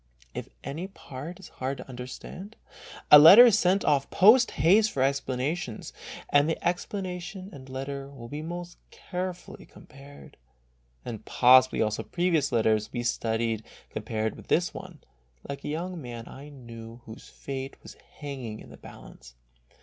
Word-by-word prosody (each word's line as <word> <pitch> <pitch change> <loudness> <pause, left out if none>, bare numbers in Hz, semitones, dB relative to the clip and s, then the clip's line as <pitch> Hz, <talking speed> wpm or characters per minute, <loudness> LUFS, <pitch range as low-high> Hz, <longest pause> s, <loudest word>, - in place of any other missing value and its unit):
If - - -6
any 160 +7 -5
part 165 -2 -9
is 190 - -12
hard 135 +2 -4
to - - -10
under 125 -1 -7
stand, 195 +10 -10 0.6
a 150 - +12
letter 195 +11 +11
is 230 -5 +5
sent 185 +2 +2
off 140 -2 +2
post 230 +6 +6
haste 200 +9 +3
for 130 - 0
explanations, 135 -1 -2 0.4
and 145 +2 +4
the 165 - -2
explanation 185 +1 -4
and 130 -1 -12
letter 135 +1 -5
will 130 -4 -11
be 145 +5 -6
most 175 +2 -7
carefully 180 -1 -6
compared, 140 +1 -15 0.7
and 115 -4 -6
possibly 130 -1 +5
also 110 -1 -2
previous 170 -5 0
letters 110 -2 +2
will - - -31
be 120 - -3
studiously 115 -2 -1 0.3
com - - -3
pared 110 0 -2
with - - -14
this 175 +1 +1
one, 180 -7 -10 0.5
like 140 0 -6
a - - -5
young 170 +3 -4
man 120 -3 -8
I 140 +2 -11
knew 115 -3 -11
whose 110 +1 -12
fate 135 -1 -6
was - - -11 0.2
hanging 130 -7 -7
in - - -13
the - - -12
balance. - - -14
140 Hz, 160 wpm, -27 LUFS, 125-175 Hz, 0.7 s, a